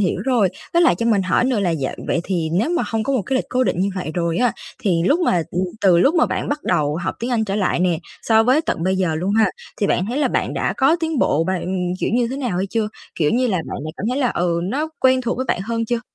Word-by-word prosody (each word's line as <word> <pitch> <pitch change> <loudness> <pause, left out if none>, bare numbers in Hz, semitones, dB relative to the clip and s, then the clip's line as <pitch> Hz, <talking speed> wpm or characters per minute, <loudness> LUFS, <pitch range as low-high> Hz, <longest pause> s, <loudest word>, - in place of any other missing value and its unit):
hiểu 190 - 0
rồi. 245 -7 +3 0.2
Với 340 +1 +4
lại 340 - +5
cho 230 - 0
mình 210 -4 +3
hỏi 185 +6 +2
nữa 250 -4 +1
là 185 -3 +1
dạ 145 -5 -2
vậy - - 0
thì 175 -4 -1
nếu 210 - +1
mà 345 0 +1
hông 225 -1 -1
có 275 - -1
một 255 -6 +1
cái 260 +8 -1
lịch - - 0
cố 255 0 +1
định 175 - 0
như 195 +2 +1
vậy 185 -4 -4
rồi 170 -1 0
á 245 -2 +2 0.3
thì 175 -5 +1
lúc 295 - +3
mà, 180 - +2
ừ, 175 - -4 0.2
từ 180 -3 +5
lúc 275 - +4
mà 325 - +4
bạn - - -3
bắt 290 +1 -2
đầu 150 +1 +1
học 175 - -3
tiếng 240 +2 -3
Anh 230 -3 +1
trở 200 -1 -2
lại 190 -4 0
nè, 175 -3 +2 0.2
so 220 -1 +4
với 255 +6 +3
tận 170 - -2
bây 190 +2 +1
giờ 180 -4 0
luôn 180 +5 -1
ha, 220 -3 +4 0.3
thì 205 - 0
bạn 185 - +1
thấy 245 +6 -2
là 300 - +2
bạn - - -1
đã - - 0
có 280 +5 +4
tiến 320 -3 -1
bộ 160 -6 +2
bạn, 180 0 -2
kiểu, - - 0
như 240 -1 +2
thế 265 - -3
nào 245 -10 -2
hay 190 +2 0
chưa? 215 +1 -1 0.3
Kiểu 150 -3 +1
như 255 +2 +2
là, 205 -6 0
bạn - - -5
đã 155 - -4
cảm 205 - -4
thấy 255 - -1
là, 255 -4 +2
ừ, 170 -1 0
nó 275 - -2
quen 260 0 +4
thuộc 240 -1 -2
với 260 - -2
bạn 180 - 0
hơn 230 +2 -2
chưa? 235 +1 -1
210 Hz, 295 wpm, -20 LUFS, 180-255 Hz, 0.3 s, lại